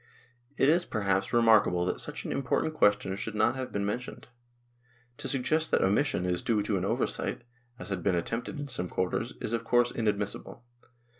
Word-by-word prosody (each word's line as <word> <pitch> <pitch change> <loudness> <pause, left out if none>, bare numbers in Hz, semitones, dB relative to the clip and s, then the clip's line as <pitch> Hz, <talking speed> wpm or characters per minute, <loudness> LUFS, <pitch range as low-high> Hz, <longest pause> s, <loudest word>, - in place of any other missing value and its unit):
It 135 - +4
is, 170 +4 +4
perhaps, 100 - -1
re 120 -1 +3
markable 105 -6 +4
that 90 - -2
such - - -4
an - - -3
important 140 +3 0
question 105 -7 +2
should 105 +2 -4
not 110 +4 +2
have 130 -1 -5
been 100 0 -1
mentioned; 120 +6 -5 0.9
to - - -4
suggest 155 +4 +1
that - - +2
that - - +4
omission 100 -1 +1
is 90 -1 0
due 110 -3 +1
to 105 0 -1
an 90 -1 -1
oversight, - - -1 0.3
as 120 - -8
has 95 -2 -2
been 90 +1 +1
attempted 115 - -3
in 145 - -4
some 100 -9 -2
quarters, 95 +6 -2
is 110 - -3
of 115 -1 -1
course 120 +1 +3
inadmissible. 105 +1 -3
110 Hz, 195 wpm, -29 LUFS, 100-125 Hz, 0.9 s, It